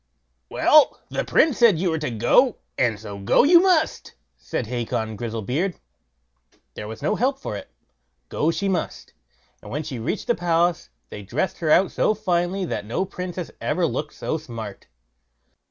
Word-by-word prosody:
"Well, 305 Hz, -1 st, +4 dB
the -, -, -2 dB
Prince 315 Hz, -5 st, +2 dB
said 230 Hz, -8 st, +6 dB
you 175 Hz, +1 st, 0 dB
were 160 Hz, -, -1 dB
to 150 Hz, -, -2 dB
go, 120 Hz, -, +3 dB, 0.2 s
and 115 Hz, -4 st, +1 dB
so 100 Hz, -2 st, -8 dB
go 100 Hz, -, +4 dB
you 340 Hz, +5 st, +7 dB
must", 360 Hz, -4 st, +1 dB, 0.2 s
said -, -, -4 dB
Hacon 110 Hz, -2 st, -3 dB
Grizzlebeard. 120 Hz, -, -2 dB, 1.0 s
There 105 Hz, -, -7 dB
was 110 Hz, +1 st, -8 dB
no -, -, +1 dB
help 265 Hz, +3 st, +1 dB
for 265 Hz, -, -5 dB
it, 100 Hz, -, -8 dB, 0.6 s
go 155 Hz, -, 0 dB
she 195 Hz, +4 st, -1 dB
must; 190 Hz, -2 st, -3 dB, 0.5 s
and -, -, -11 dB
when 150 Hz, +5 st, -3 dB
she 140 Hz, -5 st, -6 dB
reached 120 Hz, -, -3 dB
the 240 Hz, -, +2 dB
palace, 170 Hz, -, 0 dB, 0.2 s
they 105 Hz, -, -8 dB
dressed 125 Hz, -, -2 dB
her 160 Hz, -, -1 dB
out 185 Hz, +4 st, +4 dB
so 215 Hz, -, +1 dB
finely 185 Hz, -2 st, 0 dB
that 160 Hz, -, -3 dB
no 115 Hz, -, -2 dB
princess 180 Hz, -2 st, -6 dB
ever 170 Hz, +3 st, 0 dB
looked 150 Hz, -1 st, -3 dB
so 160 Hz, -, -3 dB
smart. 115 Hz, -8 st, -8 dB
165 Hz, 170 wpm, -23 LUFS, 115-195 Hz, 1.0 s, you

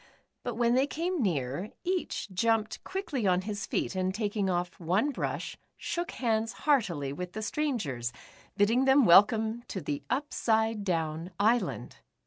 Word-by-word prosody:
But 245 Hz, -2 st, -4 dB
when 235 Hz, 0 st, +2 dB
they 265 Hz, +3 st, +3 dB
came 340 Hz, +2 st, -2 dB
near, 160 Hz, -, -1 dB
each 360 Hz, -, -2 dB
jumped 225 Hz, +2 st, 0 dB
quickly 335 Hz, -, -2 dB
on 180 Hz, 0 st, +3 dB
his 205 Hz, -1 st, -4 dB
feet, -, -, -1 dB
and 185 Hz, 0 st, 0 dB
taking 210 Hz, -2 st, -1 dB
off 175 Hz, +1 st, -2 dB
one 185 Hz, -, +1 dB
brush, -, -, -4 dB, 0.2 s
shook 345 Hz, 0 st, -3 dB
hands 225 Hz, -2 st, 0 dB
heart 280 Hz, -9 st, +4 dB
ily 145 Hz, -5 st, -3 dB
with 180 Hz, +4 st, -6 dB
the 215 Hz, -, -4 dB
strangers, 200 Hz, -, -2 dB, 0.5 s
bidding 230 Hz, +6 st, +3 dB
them 270 Hz, -1 st, +6 dB
welcome 220 Hz, +5 st, +5 dB
to 190 Hz, -, -4 dB
the 145 Hz, -4 st, -3 dB
Upsidedown 205 Hz, -, 0 dB
Island. 225 Hz, +4 st, +1 dB
215 Hz, 145 wpm, -29 LUFS, 180-245 Hz, 0.5 s, them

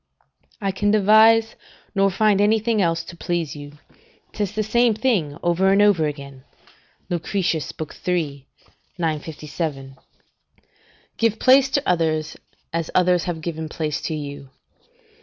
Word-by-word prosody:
["I 195 Hz, -3 st, -1 dB
can 205 Hz, +2 st, -1 dB
devise, 220 Hz, +2 st, +5 dB, 0.4 s
nor 195 Hz, -1 st, +3 dB
find 205 Hz, +1 st, +2 dB
anything 220 Hz, +1 st, +2 dB
else 165 Hz, -2 st, 0 dB
to 170 Hz, -, -11 dB
please 170 Hz, -4 st, -3 dB
you: 145 Hz, 0 st, -10 dB, 0.6 s
'tis 205 Hz, -3 st, -3 dB
the 215 Hz, -, -1 dB
same 235 Hz, +1 st, +2 dB
thing 205 Hz, -, 0 dB
over 175 Hz, +3 st, +2 dB
and 195 Hz, -, +3 dB
over 200 Hz, -7 st, +4 dB
again." 140 Hz, -3 st, -8 dB, 0.7 s
Lucretius 175 Hz, -2 st, -1 dB, 0.4 s
iii. 145 Hz, -7 st, -2 dB, 0.5 s
957] 150 Hz, -3 st, -4 dB, 1.2 s
"Give 230 Hz, -1 st, +1 dB
place 265 Hz, +2 st, +5 dB
to 285 Hz, +1 st, 0 dB
others, 160 Hz, -3 st, 0 dB, 0.4 s
as 165 Hz, -1 st, -2 dB
others 180 Hz, -1 st, +3 dB
have 170 Hz, -3 st, -4 dB
given 160 Hz, -1 st, -5 dB
place 155 Hz, -2 st, -3 dB
to 160 Hz, -, -3 dB
you. 145 Hz, -2 st, -7 dB
175 Hz, 125 wpm, -22 LUFS, 155-210 Hz, 1.2 s, devise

